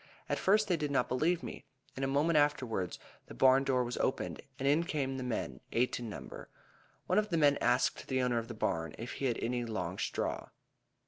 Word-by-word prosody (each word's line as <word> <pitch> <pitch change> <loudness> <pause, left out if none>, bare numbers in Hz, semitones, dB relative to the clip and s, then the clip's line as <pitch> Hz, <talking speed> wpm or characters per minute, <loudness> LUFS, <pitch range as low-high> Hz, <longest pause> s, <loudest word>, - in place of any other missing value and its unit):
At - - -1
first 210 +2 +3
they 180 -3 +2
did 150 -2 -2
not 135 -3 +1
believe 160 +7 +1
me. - - -7 0.3
In 135 - -3
a - - +2
moment 145 +5 +2
afterwards 125 - +1 0.3
the - - -10
barn 130 +1 +5
door 130 -2 +2
was 120 0 -4
opened, 130 - -1 0.2
and 135 - -1
in 150 +4 +4
came 140 -5 -2
the - - -4
men, 125 -3 -3
eight 125 +2 +1
in 120 -2 -5
number. 105 - -8 0.6
One 185 - +3
of 210 0 -1
the 170 - +1
men 145 -2 +5
asked 125 +1 +2
the 130 -1 0
owner 120 -2 +2
of 115 - -6
the 115 - -7
barn 80 -6 -1
if 115 +2 -6
he 140 - -4
had 120 -3 +1
any 120 +1 0
long 115 -2 -3
straw. - - -2
130 Hz, 215 wpm, -33 LUFS, 120-150 Hz, 0.6 s, barn